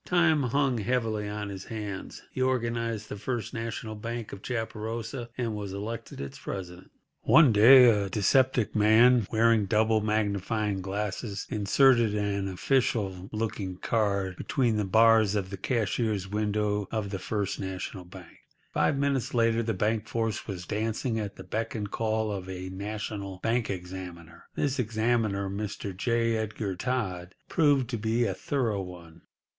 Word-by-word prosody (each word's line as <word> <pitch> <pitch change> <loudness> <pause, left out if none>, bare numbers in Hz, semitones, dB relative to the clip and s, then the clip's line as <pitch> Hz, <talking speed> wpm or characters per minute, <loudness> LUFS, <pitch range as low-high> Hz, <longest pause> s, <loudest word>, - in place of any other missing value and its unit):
Time 170 -4 +3
hung 130 -1 +1
heavily 110 -2 -1
on 105 0 -4
his 95 -1 -7
hands. 105 -4 -6
He 130 - -4
organised 115 -4 -1
the 105 - -6
First 115 +1 -3
National 115 -1 -4
Bank 115 +1 -5
of 100 - -8
Chaparosa, 115 +1 -4
and 120 -3 -1
was 100 -2 -5
elected 105 +3 -6
its 70 0 -7
president. 90 -1 -7 0.3
One 155 -5 +6
day 125 +5 +9
a 105 -4 +3
dyspeptic 120 +4 +2
man, 110 +1 +5
wearing 115 -2 +3
double 110 +1 +3
magnifying 105 -1 0
glasses, 100 +2 -3
inserted 115 +1 +4
an 100 -1 -1
official 95 -3 0
looking 105 -4 -3
card 100 -3 0
between 120 -6 0
the 105 - 0
bars 110 0 +5
of 95 -2 -2
the 100 - -5
cashier's 110 -2 -1
window 105 0 -1
of 105 -3 -3
the 95 - -3
First 100 0 -2
National 95 0 -5
Bank. 90 0 -13 0.3
Five 140 - +2
minutes 140 -3 0
later 115 -1 +3
the 115 -2 -1
bank 110 +2 0
force 115 -1 -2
was 90 -4 -5
dancing 110 +3 -1
at 100 -2 -4
the - - -10
beck 115 +2 -3
and 105 -2 -4
call 110 -1 0
of 95 -2 -5
a 95 0 -5
national 100 0 -5
bank 115 +1 +1
examiner. 90 -3 -7
This 140 -2 0
examiner, 110 -3 0
Mr. 100 -1 -4
J. 115 +3 +1
Edgar 110 -3 -3
Todd, 95 -5 -3
proved 145 -5 +3
to 120 - -2
be 115 +2 +1
a 100 - 0
thorough 115 -1 -1
one. 85 -3 -10
110 Hz, 150 wpm, -28 LUFS, 100-115 Hz, 0.3 s, day